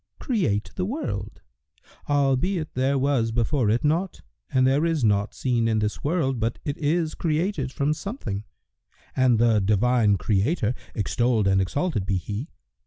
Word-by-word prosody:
create 165 Hz, -, -1 dB
the 185 Hz, -, -2 dB
world, 255 Hz, +12 st, -4 dB, 0.7 s
albeit 145 Hz, +5 st, +1 dB
there 135 Hz, +2 st, +1 dB
was 130 Hz, -4 st, +1 dB
before 120 Hz, +1 st, +1 dB
it 115 Hz, +3 st, +1 dB
naught 165 Hz, +6 st, 0 dB, 0.3 s
and 130 Hz, 0 st, +3 dB
there 135 Hz, +4 st, +3 dB
is 165 Hz, -5 st, 0 dB
naught 105 Hz, -1 st, +2 dB
seen 120 Hz, -3 st, 0 dB
in 110 Hz, -1 st, +1 dB
this 105 Hz, 0 st, -2 dB
world 140 Hz, -5 st, 0 dB
but 115 Hz, +1 st, -1 dB
it 145 Hz, -2 st, -2 dB
is 160 Hz, +1 st, 0 dB
created 160 Hz, -4 st, -1 dB
from 140 Hz, +2 st, 0 dB
something; 155 Hz, -, -5 dB, 0.7 s
and 130 Hz, -3 st, +4 dB
the 115 Hz, -1 st, +4 dB
Divine 105 Hz, +1 st, +3 dB
Creator 110 Hz, -, +1 dB, 0.2 s
(extolled 115 Hz, 0 st, +1 dB
and 95 Hz, 0 st, +3 dB
exalted 105 Hz, -, -1 dB
be 95 Hz, -, +1 dB
He!) 105 Hz, -, -5 dB
130 Hz, 150 wpm, -25 LUFS, 110-155 Hz, 0.7 s, and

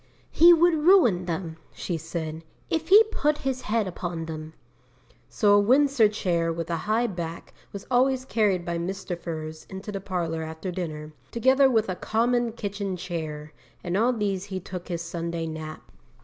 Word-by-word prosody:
"He 340 Hz, +2 st, +7 dB
would 345 Hz, +1 st, +5 dB
ruin 305 Hz, -, +4 dB
them," 165 Hz, -1 st, -4 dB, 0.2 s
she 175 Hz, -, -3 dB
said, 160 Hz, 0 st, -5 dB, 0.3 s
"if 320 Hz, 0 st, -1 dB
he 415 Hz, +4 st, +9 dB
put 300 Hz, -7 st, +1 dB
his 265 Hz, -2 st, -3 dB
head 220 Hz, -3 st, 0 dB
upon 175 Hz, -2 st, -4 dB
them." 155 Hz, -1 st, -7 dB, 0.8 s
So 205 Hz, -2 st, +3 dB
a 205 Hz, -, +7 dB
Windsor 255 Hz, +1 st, +4 dB
chair 170 Hz, -5 st, 0 dB
with 165 Hz, 0 st, -4 dB
a -, -, +1 dB
high 225 Hz, +3 st, +2 dB
back 170 Hz, -6 st, -6 dB, 0.2 s
was 200 Hz, -, -8 dB
always 255 Hz, +1 st, +2 dB
carried 205 Hz, -8 st, +1 dB
by 170 Hz, 0 st, -2 dB
Mr. 185 Hz, +1 st, -4 dB
Furze 160 Hz, -2 st, -7 dB
into 190 Hz, +2 st, -7 dB
the 195 Hz, -1 st, -5 dB
parlour 170 Hz, -4 st, -2 dB
after 160 Hz, +3 st, -5 dB
dinner, 155 Hz, -4 st, -5 dB, 0.2 s
together 260 Hz, +3 st, +4 dB
with 225 Hz, -3 st, +2 dB
a 185 Hz, -, -2 dB
common 235 Hz, +4 st, 0 dB
kitchen 200 Hz, -3 st, -4 dB
chair, 155 Hz, -4 st, -5 dB, 0.3 s
and 175 Hz, -, -2 dB
on 235 Hz, +4 st, +2 dB
these 200 Hz, -3 st, -1 dB
he 190 Hz, -2 st, -5 dB
took 180 Hz, -1 st, -8 dB
his 170 Hz, -2 st, -3 dB
Sunday 170 Hz, 0 st, -4 dB
nap.' 155 Hz, -1 st, -7 dB
185 Hz, 170 wpm, -26 LUFS, 165-230 Hz, 0.8 s, he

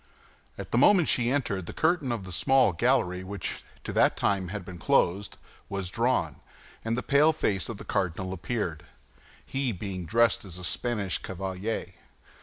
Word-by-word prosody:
At -, -, -7 dB
the -, -, +3 dB
moment 190 Hz, -6 st, +6 dB
she 120 Hz, -1 st, +2 dB
entered, 105 Hz, -10 st, -1 dB
the -, -, -5 dB
curtain 160 Hz, -5 st, +1 dB
of 105 Hz, -5 st, -3 dB
a -, -, -7 dB
small 130 Hz, +6 st, +4 dB
gallery 90 Hz, +2 st, +1 dB
which 95 Hz, -1 st, -5 dB, 0.2 s
to -, -, -5 dB
that -, -, +3 dB
time 95 Hz, -2 st, +1 dB
had 100 Hz, 0 st, -5 dB
been 90 Hz, -2 st, -9 dB
closed, 95 Hz, +4 st, +1 dB, 0.3 s
was 95 Hz, -2 st, -4 dB
drawn, 115 Hz, -, 0 dB, 0.5 s
and 115 Hz, +1 st, -1 dB
the 125 Hz, -, -2 dB
pale 140 Hz, +6 st, +5 dB
face 105 Hz, -, -1 dB
of 115 Hz, -, -5 dB
the -, -, -10 dB
cardinal 95 Hz, 0 st, -1 dB
appeared, 90 Hz, -4 st, -3 dB, 0.6 s
he 135 Hz, -2 st, -1 dB
being 95 Hz, -3 st, -5 dB
dressed 115 Hz, +2 st, +3 dB
as 90 Hz, -4 st, -8 dB
a 90 Hz, -, -8 dB
Spanish 105 Hz, -3 st, -1 dB
cavalier. 95 Hz, +3 st, -4 dB
100 Hz, 170 wpm, -28 LUFS, 90-120 Hz, 0.6 s, moment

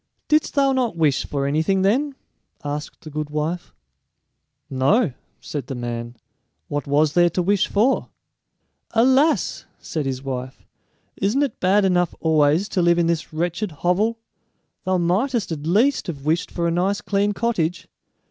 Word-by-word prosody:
"Didst 305 Hz, 0 st, +2 dB
thou 275 Hz, -1 st, +4 dB
not 245 Hz, -8 st, 0 dB
wish 150 Hz, -4 st, +1 dB
for 140 Hz, -1 st, -2 dB
anything 160 Hz, +7 st, +1 dB
then?" 270 Hz, +8 st, +1 dB, 0.5 s
asked 145 Hz, +1 st, -5 dB
the 155 Hz, -, -10 dB
good 150 Hz, 0 st, -4 dB
wife. 155 Hz, +4 st, -3 dB, 1.0 s
"No," 140 Hz, -, +2 dB, 0.3 s
said 140 Hz, -4 st, -6 dB
the 135 Hz, -, -4 dB
man; 120 Hz, 0 st, -5 dB, 0.5 s
"what 145 Hz, 0 st, -3 dB
was 145 Hz, +1 st, +2 dB
there 175 Hz, 0 st, +5 dB
to 180 Hz, -, -1 dB
wish 200 Hz, +2 st, +2 dB
for?" 230 Hz, +7 st, +1 dB, 0.9 s
"Alas!" 265 Hz, +7 st, +3 dB
said 155 Hz, -5 st, -4 dB
his 130 Hz, 0 st, -3 dB
wife; 130 Hz, -1 st, -6 dB, 0.5 s
"isn't 215 Hz, +9 st, +1 dB
it 275 Hz, -6 st, -3 dB
bad 195 Hz, +2 st, +3 dB
enough 180 Hz, -2 st, +1 dB
always 160 Hz, +3 st, +3 dB
to 185 Hz, -, 0 dB
live 170 Hz, 0 st, +4 dB
in 170 Hz, -, +3 dB
this 165 Hz, -1 st, -1 dB
wretched 175 Hz, +5 st, -2 dB
hovel? 180 Hz, +9 st, 0 dB, 0.7 s
Thou 185 Hz, 0 st, +2 dB
mightest 195 Hz, +6 st, 0 dB
at 155 Hz, -1 st, -4 dB
least 225 Hz, +9 st, +2 dB
have 145 Hz, -5 st, -6 dB
wished 160 Hz, +3 st, 0 dB
for 170 Hz, -1 st, -1 dB
a -, -, +1 dB
nice 190 Hz, +4 st, +1 dB
clean 205 Hz, 0 st, 0 dB
cottage. 190 Hz, -7 st, -1 dB
175 Hz, 155 wpm, -22 LUFS, 150-205 Hz, 1.0 s, there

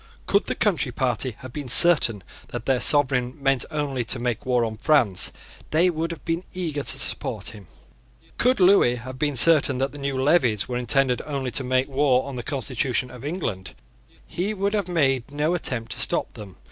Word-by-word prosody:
Could 200 Hz, +1 st, +1 dB
the -, -, -2 dB
Country 165 Hz, -, 0 dB
Party 125 Hz, -1 st, -2 dB
have 130 Hz, -1 st, -10 dB
been 145 Hz, -3 st, -6 dB
certain 125 Hz, -, +5 dB, 0.2 s
that 115 Hz, -, -7 dB
their 130 Hz, -1 st, +1 dB
sovereign 135 Hz, -3 st, +3 dB
meant 135 Hz, -3 st, +1 dB
only 140 Hz, -4 st, -2 dB
to 120 Hz, -, -2 dB
make 120 Hz, 0 st, -3 dB
war 125 Hz, -2 st, +2 dB
on 110 Hz, -1 st, -6 dB
France, 120 Hz, -, +1 dB, 0.4 s
they 175 Hz, +4 st, +3 dB
would 165 Hz, 0 st, -3 dB
have 170 Hz, -, -9 dB
been 165 Hz, +2 st, -2 dB
eager 165 Hz, -6 st, -3 dB
to 135 Hz, -, +2 dB
support 110 Hz, -5 st, 0 dB
him. 105 Hz, -5 st, -13 dB, 0.7 s
Could 250 Hz, 0 st, +2 dB
Lewis 180 Hz, -10 st, +4 dB
have 130 Hz, +1 st, -9 dB
been 145 Hz, -2 st, -1 dB
certain 140 Hz, -1 st, +4 dB
that 135 Hz, +2 st, -1 dB
the 145 Hz, -, -11 dB
new 140 Hz, -1 st, -3 dB
levies 130 Hz, -, +2 dB
were 125 Hz, -, -3 dB
intended 125 Hz, +1 st, +1 dB
only 135 Hz, -4 st, -3 dB
to 130 Hz, -, -1 dB
make 130 Hz, +1 st, 0 dB
war 135 Hz, -2 st, +1 dB
on 140 Hz, -, -7 dB
the 125 Hz, -, -4 dB
constitution 130 Hz, -1 st, -2 dB
of 125 Hz, 0 st, -12 dB
England, 145 Hz, -, -5 dB, 0.5 s
he 200 Hz, +5 st, -3 dB
would 200 Hz, +1 st, -1 dB
have 205 Hz, -4 st, -1 dB
made 135 Hz, -8 st, 0 dB
no 150 Hz, +4 st, -1 dB
attempt 125 Hz, -9 st, -3 dB
to -, -, -4 dB
stop -, -, 0 dB
them. 100 Hz, -3 st, -11 dB
135 Hz, 195 wpm, -23 LUFS, 125-155 Hz, 0.7 s, certain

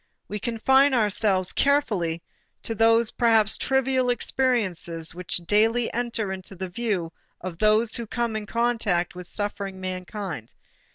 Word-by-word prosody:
We 210 Hz, -, -4 dB
confine 265 Hz, +5 st, +3 dB
ourselves 205 Hz, -4 st, +1 dB
carefully 205 Hz, -, +1 dB, 0.4 s
to 225 Hz, -, -2 dB
those 225 Hz, 0 st, +3 dB
perhaps 225 Hz, -3 st, +4 dB
trivial 265 Hz, -1 st, +1 dB
experiences 200 Hz, -11 st, -1 dB
which 180 Hz, +1 st, -1 dB
daily 225 Hz, +5 st, +2 dB
enter 230 Hz, -4 st, -2 dB
into 190 Hz, 0 st, -6 dB
the 185 Hz, 0 st, -5 dB
view 185 Hz, -5 st, -2 dB, 0.3 s
of 175 Hz, -2 st, -7 dB
those 215 Hz, +1 st, +3 dB
who 235 Hz, -1 st, -4 dB
come 235 Hz, 0 st, -2 dB
in 215 Hz, -1 st, -4 dB
contact 230 Hz, -7 st, 0 dB
with 180 Hz, 0 st, -8 dB
suffering 200 Hz, -2 st, -4 dB
mankind. 185 Hz, -, -6 dB
215 Hz, 130 wpm, -25 LUFS, 185-235 Hz, 0.4 s, perhaps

